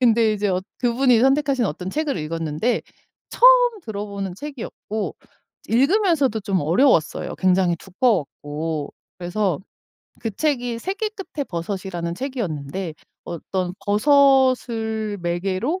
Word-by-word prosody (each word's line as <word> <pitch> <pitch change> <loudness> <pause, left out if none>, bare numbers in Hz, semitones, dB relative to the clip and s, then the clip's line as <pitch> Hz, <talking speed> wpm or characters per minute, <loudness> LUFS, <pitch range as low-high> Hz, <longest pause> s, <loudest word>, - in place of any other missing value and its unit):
근데 230 -3 +4
이제 205 -1 -1
어 185 0 +1 0.2
그분이 245 -1 +3
선택하신 270 -1 +3
어떤 185 -1 -3
책을 305 -2 -1
읽었는데 160 +7 -1 0.5
처음 - - +6
들어보는 200 -3 -5
책이었고 230 -5 -5 0.5
읽으면서도 280 - +3
좀 195 -2 0
어려웠어요 170 - +2
굉장히 185 -2 +2
두꺼웠고. 160 - -2 0.3
그래서 180 -1 -1 0.6
그 225 - -2
책이 245 -1 -1
세계 400 - -3
끝에 370 -9 -6
버섯이라는 175 -2 -4
책이었는데 180 - -4 0.3
어떤 180 +2 -3
버섯을 235 -3 +3
매개로 185 - -1
215 Hz, 290 characters per minute, -22 LUFS, 180-270 Hz, 0.6 s, 처음